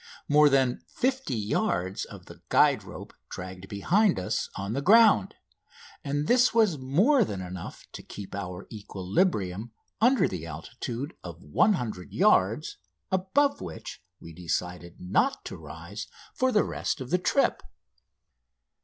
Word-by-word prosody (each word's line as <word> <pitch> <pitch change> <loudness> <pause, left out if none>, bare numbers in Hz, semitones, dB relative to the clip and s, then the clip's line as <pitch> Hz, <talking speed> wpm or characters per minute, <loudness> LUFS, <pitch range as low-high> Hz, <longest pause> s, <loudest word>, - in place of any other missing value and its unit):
More 150 0 +6
than 130 -3 +2
50 260 - -1
yards 105 - -1
of - - -12
the - - -14
guide - - +4
rope - - -10 0.2
dragged 95 +1 -8
behind 180 - +2
us 90 - -2
on 100 +2 -4
the 140 - -1
ground; 225 +7 +5 0.7
and 145 0 -1
this 250 -1 +4
was 210 -10 +3
more 195 - +3
than 100 - -4
enough 90 -1 -8
to - - -8
keep 100 -2 -9
our 90 -2 -5
equilibrium 100 - -1 0.3
under 240 -4 +4
the 85 -3 -6
altitude 120 - -6
of 85 0 -9
100 110 - 0
yards, 110 +11 +2 0.3
above 190 +10 +1
which 85 -4 -8 0.2
we 85 - -11
decided 90 +1 -4
not 90 +1 0
to - - -6
rise 85 +8 -8 0.3
for 260 0 +1
the 210 - +4
rest - - -3
of 130 -1 -7
the 180 - +3
trip. 180 - +1
115 Hz, 135 wpm, -27 LUFS, -, 0.7 s, More